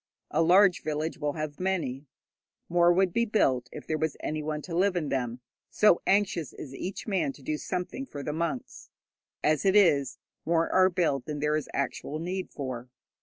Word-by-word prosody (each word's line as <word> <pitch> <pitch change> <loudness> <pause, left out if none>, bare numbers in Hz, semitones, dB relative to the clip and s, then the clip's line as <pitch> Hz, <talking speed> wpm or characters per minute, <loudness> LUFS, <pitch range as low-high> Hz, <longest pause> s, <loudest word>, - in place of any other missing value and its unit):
A 155 - +2
large 180 +2 +5
village 155 +2 -3
will 145 -1 -1
have 155 -1 -5
many. 165 -8 -2 0.6
More 175 0 +5
would 180 0 +2
be 235 - +2
built 130 - +1
if - - -9
there 155 -1 -2
was 160 -1 -1
anyone 155 0 -3
to 170 - -5
live 190 +2 +2
in 155 -5 -1
them, 125 -2 -2 0.3
so 210 -5 +4
anxious 195 -8 +1
is 135 - -9
each 185 +7 -5
man 190 -9 0
to 140 - -16
do 155 - -1
something 180 - -4
for 145 - -7
the 150 - -3
monks. 170 +10 -4 0.5
As 155 -1 +2
it 195 0 +3
is, 145 -10 +4 0.3
more 165 0 +2
are 185 0 +5
built 160 -8 0
than 150 -1 -4
there 150 +1 +1
is 155 - -3
actual 140 +1 -3
need 180 +3 -4
for. 130 -3 -6
160 Hz, 185 wpm, -28 LUFS, 145-185 Hz, 0.6 s, large